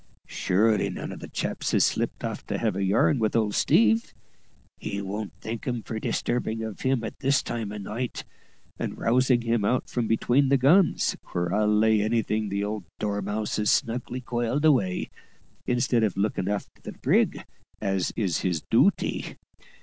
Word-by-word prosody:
Surety 105 Hz, +3 st, +1 dB
none -, -, -5 dB
of -, -, -8 dB
the -, -, -8 dB
chaps -, -, -2 dB
is -, -, +5 dB
slipped -, -, -2 dB
off -, -, -4 dB
to -, -, -2 dB
have 110 Hz, -5 st, 0 dB
a 100 Hz, -, -1 dB
yarn 105 Hz, +7 st, +3 dB
with 110 Hz, 0 st, 0 dB
old 110 Hz, -3 st, +1 dB
Steve; 110 Hz, 0 st, +3 dB, 0.6 s
he 100 Hz, -, -4 dB
won't 100 Hz, +1 st, -4 dB
thank 115 Hz, +5 st, -5 dB
'em 120 Hz, -3 st, -2 dB
for 110 Hz, -, -5 dB
disturbing 115 Hz, -1 st, -1 dB
of 110 Hz, -2 st, -6 dB
him 130 Hz, -3 st, +1 dB
at 110 Hz, -, -6 dB
this 140 Hz, +1 st, +2 dB
time 110 Hz, -3 st, -4 dB
o' 105 Hz, -, -6 dB
night, 110 Hz, +5 st, -4 dB, 0.6 s
and -, -, -3 dB
rousing 125 Hz, +1 st, +2 dB
him 115 Hz, -2 st, +1 dB
out 125 Hz, +5 st, +1 dB
from 120 Hz, -2 st, -2 dB
between 125 Hz, +5 st, +2 dB
the 140 Hz, -, +5 dB
guns, 160 Hz, +8 st, +4 dB, 0.2 s
where 90 Hz, 0 st, -1 dB
I'll 105 Hz, +1 st, +2 dB
lay 105 Hz, 0 st, +4 dB
anything 110 Hz, -1 st, 0 dB
the 100 Hz, +1 st, -1 dB
old 105 Hz, -2 st, -4 dB
dormouse 105 Hz, +1 st, -2 dB
is 105 Hz, -, +1 dB
snugly 125 Hz, +2 st, 0 dB
coiled 120 Hz, +4 st, -1 dB
away, 120 Hz, -12 st, +2 dB, 0.6 s
instead 120 Hz, -1 st, +2 dB
of 105 Hz, -4 st, 0 dB
looking 100 Hz, -2 st, 0 dB
a'ter 105 Hz, 0 st, -1 dB, 0.2 s
the -, -, -8 dB
brig, -, -, +1 dB, 0.3 s
as 95 Hz, -3 st, -1 dB
is 95 Hz, -7 st, 0 dB
his 90 Hz, -4 st, -1 dB
dooty. -, -, +2 dB
110 Hz, 175 wpm, -26 LUFS, 105-120 Hz, 0.6 s, is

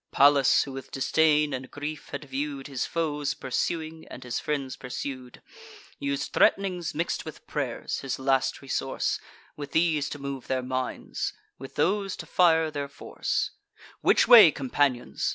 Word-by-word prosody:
Pallas, 140 Hz, -1 st, +5 dB
who 140 Hz, -, -8 dB
with 135 Hz, 0 st, -8 dB
disdain 150 Hz, +1 st, +2 dB
and 130 Hz, 0 st, -5 dB
grief 150 Hz, +1 st, -6 dB
had 145 Hz, +1 st, -6 dB
view'd 140 Hz, 0 st, -4 dB
His 135 Hz, -3 st, -3 dB
foes 150 Hz, -4 st, -1 dB
pursuing, 160 Hz, +4 st, -3 dB
and -, -, -9 dB
his 125 Hz, -1 st, -3 dB
friends 140 Hz, -3 st, -3 dB
pursued, 130 Hz, -1 st, -7 dB, 0.6 s
Us'd 140 Hz, 0 st, -2 dB
threat'nings 180 Hz, -4 st, +2 dB
mix'd 165 Hz, +2 st, -1 dB
with -, -, -10 dB
pray'rs, -, -, -3 dB
his 135 Hz, -2 st, -3 dB
last 135 Hz, +1 st, +1 dB
resource, 135 Hz, 0 st, -1 dB, 0.4 s
With 145 Hz, -1 st, -8 dB
these 160 Hz, -3 st, +2 dB
to -, -, -6 dB
move 140 Hz, -2 st, -6 dB
their 130 Hz, -1 st, -1 dB
minds, 130 Hz, 0 st, -3 dB, 0.3 s
with 135 Hz, -, -10 dB
those 195 Hz, 0 st, +1 dB
to -, -, -8 dB
fire 160 Hz, -3 st, +3 dB
their 145 Hz, -1 st, -3 dB
force 140 Hz, -, -3 dB, 0.5 s
"Which -, -, +4 dB
way, 220 Hz, -8 st, +10 dB
companions? 135 Hz, -3 st, 0 dB
140 Hz, 150 wpm, -27 LUFS, 135-155 Hz, 0.6 s, way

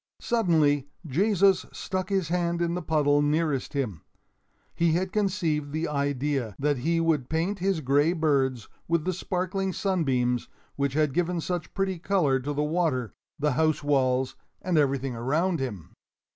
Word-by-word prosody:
Suddenly 155 Hz, -, +2 dB, 0.2 s
Jesus 195 Hz, +5 st, +3 dB
stuck 185 Hz, 0 st, -4 dB
his 190 Hz, -5 st, 0 dB
hand 170 Hz, -1 st, 0 dB
in 170 Hz, 0 st, 0 dB
the 180 Hz, -, -2 dB
puddle 145 Hz, -2 st, +2 dB
nearest 150 Hz, -2 st, 0 dB
him. 110 Hz, -, -2 dB, 0.7 s
He 170 Hz, -1 st, +2 dB
had 185 Hz, +2 st, 0 dB
conceived 175 Hz, -8 st, 0 dB
the 160 Hz, +2 st, -1 dB
idea 140 Hz, -5 st, -1 dB
that 145 Hz, 0 st, +1 dB
he 165 Hz, +6 st, +1 dB
would 160 Hz, -6 st, +1 dB
paint 170 Hz, +6 st, -1 dB
his 190 Hz, -2 st, 0 dB
gray 145 Hz, +4 st, +3 dB
birds 135 Hz, -, +1 dB, 0.2 s
with 165 Hz, -2 st, +1 dB
the 185 Hz, -, 0 dB
sparkling 185 Hz, +1 st, -2 dB
sunbeams 130 Hz, -, 0 dB, 0.3 s
which 140 Hz, -1 st, -1 dB
had 150 Hz, -2 st, +1 dB
given 175 Hz, +1 st, 0 dB
such 175 Hz, -1 st, -4 dB
pretty 190 Hz, -2 st, -1 dB
color 165 Hz, -8 st, +2 dB
to 140 Hz, +3 st, -4 dB
the 145 Hz, +1 st, 0 dB
water, 150 Hz, -, 0 dB, 0.2 s
the 150 Hz, -1 st, +1 dB
house 155 Hz, +2 st, +1 dB
walls, 130 Hz, -2 st, +1 dB, 0.2 s
and 180 Hz, -1 st, -1 dB
everything 135 Hz, -4 st, +1 dB
around 155 Hz, +9 st, 0 dB
him. 105 Hz, -, -5 dB
155 Hz, 155 wpm, -27 LUFS, 140-180 Hz, 0.7 s, Jesus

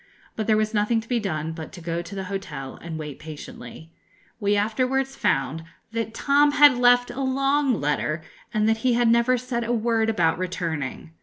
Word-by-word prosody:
But 220 Hz, -, -3 dB
there 215 Hz, -1 st, +4 dB
was 215 Hz, +1 st, 0 dB
nothing 210 Hz, +2 st, +2 dB
to 225 Hz, -, -16 dB
be 245 Hz, -1 st, +1 dB
done 160 Hz, -6 st, -3 dB
but 160 Hz, -1 st, -8 dB
to 180 Hz, -, -9 dB
go 170 Hz, 0 st, -3 dB
to 175 Hz, +3 st, -9 dB
the 195 Hz, -, -3 dB
hotel 185 Hz, -9 st, -6 dB
and 165 Hz, -1 st, -6 dB
wait 150 Hz, -3 st, -7 dB
patiently. 155 Hz, -1 st, -10 dB, 0.5 s
We 205 Hz, -1 st, +2 dB
afterwards 255 Hz, +6 st, 0 dB
found 135 Hz, +4 st, 0 dB, 0.3 s
that 225 Hz, -1 st, -3 dB
Tom 290 Hz, +2 st, +3 dB
had 290 Hz, -3 st, +7 dB
left 245 Hz, 0 st, +4 dB
a 255 Hz, +3 st, -5 dB
long 275 Hz, -1 st, +1 dB
letter, 155 Hz, +2 st, -1 dB, 0.3 s
and 215 Hz, -1 st, +1 dB
that 225 Hz, 0 st, +3 dB
he 245 Hz, +2 st, +1 dB
had 240 Hz, 0 st, +3 dB
never 235 Hz, +2 st, +3 dB
said 240 Hz, -1 st, -3 dB
a 230 Hz, -, -2 dB
word 225 Hz, -1 st, +1 dB
about 170 Hz, -7 st, +1 dB
returning. 165 Hz, -5 st, -4 dB
215 Hz, 190 wpm, -24 LUFS, 165-245 Hz, 0.5 s, had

